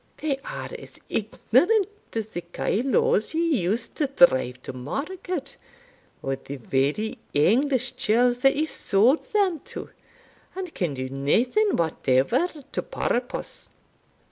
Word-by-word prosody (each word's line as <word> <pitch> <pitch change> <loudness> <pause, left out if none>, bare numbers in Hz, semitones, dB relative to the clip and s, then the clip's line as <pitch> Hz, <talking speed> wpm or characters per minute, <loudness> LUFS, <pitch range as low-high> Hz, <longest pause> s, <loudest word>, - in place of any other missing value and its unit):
They 295 -3 -1
are - - -6
as - - -12
ignorant 275 - +2 0.3
as 220 -1 -3
the 175 - -4
kyloes 275 - +1
ye 325 - +2
used 220 +7 -1
to 300 - +1
drive 130 - +4
to - - -6
market, 280 - -4 0.7
or 135 0 -1
the 140 - -8
very 140 - -1 0.2
English 250 - +3
churls 245 +3 +3
that 270 +2 +4
ye 305 +2 +1
sauld 240 0 +2
them 390 -6 +2
to, - - -8 0.6
and 370 -3 -5
can 170 -7 -2
do 130 0 -3
naething 230 - +2
whatever 160 - +2 0.2
to - - -1
purpose." 245 +1 -3
240 Hz, 125 wpm, -25 LUFS, -, 0.7 s, drive